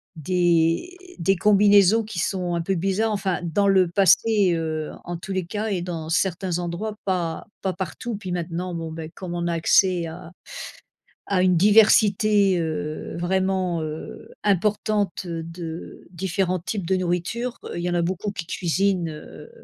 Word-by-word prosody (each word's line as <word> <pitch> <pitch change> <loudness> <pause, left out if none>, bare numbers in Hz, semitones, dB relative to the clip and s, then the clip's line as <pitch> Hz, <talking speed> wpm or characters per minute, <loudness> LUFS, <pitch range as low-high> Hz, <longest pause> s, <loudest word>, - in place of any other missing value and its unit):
des 175 - +1 0.2
des 195 +3 +2
combinaisons 205 +2 +5
qui 210 -4 -8
sont 180 0 -1
un 170 - -1
peu 195 +3 0
bizarres 195 +5 0
enfin 195 -3 -1
dans 200 +4 +1
le 190 -2 +4
passé, 195 +1 +4
heu, 155 -1 -3
en 175 - -5
tous 185 +3 -7
les 185 -2 -1
cas 210 +4 -3
et 185 -4 -1
dans 165 -3 -5
certains 180 0 0
endroits, 180 +5 -4
pas 175 -4 -1 0.2
pas 190 -2 -1
partout, 195 +6 -5
puis 185 -3 -6
maintenant, 175 +1 -3
bon, 165 -1 -4
ben 160 0 -7
comme 175 -2 -6
on 170 0 -2
a 170 - 0
accès 170 +1 +3
à 165 0 -9 1.0
à 190 -2 +2
une 180 -2 +4
diversité, 205 -1 +5
heu, 155 0 -4
vraiment, 185 -1 0
heu, 155 0 -7
importante 205 -1 0
de 165 0 -7
différents 185 0 -1
types 190 0 -4
de 190 - +2
nourriture, 185 +7 -2 0.2
il 170 - -3
y 180 - -1
en 175 - -1
a 170 - +2
beaucoup 185 +4 -2
qui 175 -4 -6
cuisinent, 180 0 0
heu, 155 - -10
180 Hz, 160 wpm, -23 LUFS, 170-195 Hz, 1.0 s, combinaisons